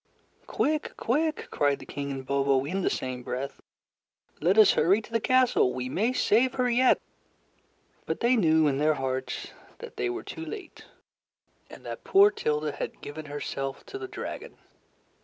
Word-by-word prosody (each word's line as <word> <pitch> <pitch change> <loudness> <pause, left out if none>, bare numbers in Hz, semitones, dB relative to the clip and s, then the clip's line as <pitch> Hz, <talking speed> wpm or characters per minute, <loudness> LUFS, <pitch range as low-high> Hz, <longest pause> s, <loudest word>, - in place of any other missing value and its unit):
"Quick! 305 +1 -1
quick!" 305 +6 0
cried 145 -1 +2
the - - -12
King 140 0 -5
and 135 -1 -5
Bobo 140 -1 +2
in 190 +6 -2
the - - +1
same 130 -1 -3
breath, 130 +3 -5 0.8
"Let 185 +5 +3
us 215 -2 +8
hurry 195 +5 +3
to 225 - -13
the 230 - +1
castle. 255 - +3
We 125 0 -3
may 215 - +1
save 250 0 +2
her 250 -1 +1
yet." 245 +1 +4 1.1
But - - -2
they 245 +2 +3
knew 160 -7 +4
in 140 -2 +1
their 155 +1 +3
hearts 130 -1 -3 0.3
that 475 -1 -10
they 380 - 0
were 365 0 -4
too 325 - -7
late, 395 +4 -9 0.8
and - - -13
that - - -6
poor 400 +1 +6
Tilda 150 - -1
had - - -6
given 155 +2 -7
herself 135 -1 -5
to 400 - -7
the 385 - -5
dragon. - - -7
175 Hz, 170 wpm, -27 LUFS, -, 1.1 s, us